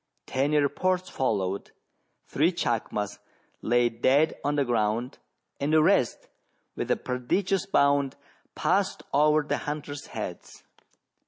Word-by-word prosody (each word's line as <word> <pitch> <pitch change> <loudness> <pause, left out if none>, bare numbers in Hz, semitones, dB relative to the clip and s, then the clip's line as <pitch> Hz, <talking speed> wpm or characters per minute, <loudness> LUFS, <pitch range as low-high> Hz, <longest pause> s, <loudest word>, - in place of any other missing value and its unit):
Ten 140 +3 0
reports 180 +5 +1
followed: 100 -6 -1 0.5
three 160 +6 +2
chacmas 110 - -2 0.4
lay 120 +1 +3
dead 130 +7 +2
on 145 +1 0
the 140 -1 +2
ground, 115 +1 -1 0.4
and 140 +2 -1
the 155 -1 +5
rest, 160 - +2 0.5
with - - -4
a - - +2
prodigious 185 +11 -1
bound, 140 -5 +2 0.4
passed 195 +1 0
over 150 +2 +4
the 145 - -1
hunters' 145 -1 -5
heads. - - -7
140 Hz, 115 wpm, -27 LUFS, 120-155 Hz, 0.5 s, the